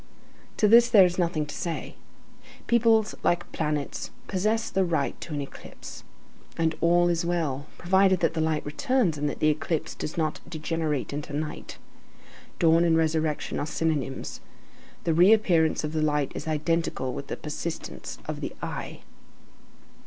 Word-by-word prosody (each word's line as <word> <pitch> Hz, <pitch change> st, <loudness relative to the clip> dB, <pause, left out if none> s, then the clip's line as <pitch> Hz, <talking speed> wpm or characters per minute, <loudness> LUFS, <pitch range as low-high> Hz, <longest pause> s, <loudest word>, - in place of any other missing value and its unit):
To 210 Hz, -, +4 dB
this 235 Hz, +2 st, +7 dB
there 205 Hz, -5 st, +8 dB
is 180 Hz, +1 st, -1 dB
nothing 170 Hz, -3 st, 0 dB
to 150 Hz, -, -8 dB
say. 170 Hz, -2 st, -4 dB, 0.7 s
Peoples, 225 Hz, -2 st, +3 dB
like 175 Hz, 0 st, 0 dB
planets, 150 Hz, -2 st, -2 dB, 0.2 s
possess 215 Hz, +4 st, 0 dB
the 190 Hz, -, +2 dB
right 160 Hz, -6 st, 0 dB
to 155 Hz, -, -5 dB
an 145 Hz, -, -2 dB
eclipse. 140 Hz, -, -10 dB, 0.5 s
And 165 Hz, 0 st, +1 dB
all 175 Hz, +1 st, +4 dB
is 170 Hz, -1 st, +1 dB
well, 155 Hz, -5 st, -1 dB
provided 190 Hz, +1 st, +3 dB
that -, -, +2 dB
the 160 Hz, -, -1 dB
light 155 Hz, -1 st, 0 dB
returns 235 Hz, -, +1 dB
and 145 Hz, 0 st, -1 dB
that -, -, -5 dB
the 155 Hz, -, +4 dB
eclipse 155 Hz, +1 st, -1 dB
does 150 Hz, -, -6 dB
not 155 Hz, -2 st, -1 dB
degenerate 155 Hz, -3 st, -2 dB
into 145 Hz, 0 st, -5 dB
night. 150 Hz, +1 st, -5 dB, 0.8 s
Dawn 165 Hz, 0 st, +4 dB
and 165 Hz, -1 st, +3 dB
resurrection 160 Hz, -1 st, 0 dB
are 145 Hz, -, -2 dB
synonymous. 150 Hz, -5 st, -2 dB, 0.6 s
The 165 Hz, -, +1 dB
reappearance 175 Hz, -3 st, +4 dB
of 150 Hz, +1 st, -3 dB
the 155 Hz, -, 0 dB
light 150 Hz, -2 st, +1 dB
is 155 Hz, -, -6 dB
identical 155 Hz, -4 st, -1 dB
with 140 Hz, -, -6 dB
the -, -, -4 dB
persistence 160 Hz, +2 st, -6 dB
of -, -, -5 dB
the -, -, -5 dB
I. -, -, -6 dB
160 Hz, 155 wpm, -26 LUFS, 150-175 Hz, 0.8 s, there